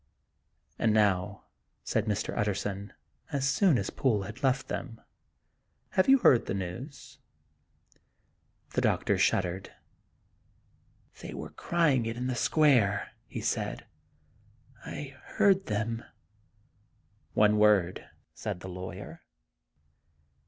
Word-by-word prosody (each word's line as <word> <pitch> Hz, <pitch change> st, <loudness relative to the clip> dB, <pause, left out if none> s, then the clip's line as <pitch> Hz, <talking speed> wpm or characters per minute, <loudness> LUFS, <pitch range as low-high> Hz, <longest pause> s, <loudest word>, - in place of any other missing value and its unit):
" -, -, -43 dB
And 110 Hz, -2 st, +3 dB
now," 100 Hz, -4 st, +1 dB, 0.4 s
said 110 Hz, -, 0 dB
Mr. 105 Hz, -2 st, -2 dB
Utterson, 100 Hz, 0 st, -2 dB, 0.4 s
as 140 Hz, -2 st, 0 dB
soon 165 Hz, +1 st, +4 dB
as 100 Hz, -, -2 dB
Poole 115 Hz, -8 st, +1 dB
had 105 Hz, +6 st, -9 dB
left 135 Hz, 0 st, +1 dB
them, 115 Hz, -3 st, -5 dB, 0.9 s
"have 185 Hz, -, +2 dB
you 270 Hz, -, +8 dB
heard 130 Hz, -, +4 dB
the -, -, -1 dB
news? 115 Hz, -, -7 dB, 0.7 s
" -, -, -39 dB
The -, -, +1 dB
doctor -, -, +1 dB
shuddered. 95 Hz, 0 st, 0 dB, 1.5 s
"They -, -, -7 dB
were -, -, -7 dB
crying 150 Hz, -9 st, +1 dB
it 115 Hz, +1 st, -4 dB
in 125 Hz, -, -3 dB
the 130 Hz, -, -1 dB
square," 120 Hz, -6 st, +3 dB, 0.2 s
he -, -, -6 dB
said; -, -, -2 dB, 0.5 s
" 115 Hz, +4 st, -28 dB
I 135 Hz, -2 st, -6 dB, 0.2 s
heard 195 Hz, -1 st, +4 dB
them." 110 Hz, +2 st, -2 dB, 0.7 s
" 105 Hz, -, -39 dB, 0.5 s
One 105 Hz, 0 st, +4 dB
word," 100 Hz, -4 st, +3 dB, 0.2 s
said 100 Hz, -5 st, -5 dB
the 95 Hz, -, -7 dB
lawyer. 90 Hz, +1 st, -8 dB
110 Hz, 120 wpm, -29 LUFS, 100-130 Hz, 1.5 s, you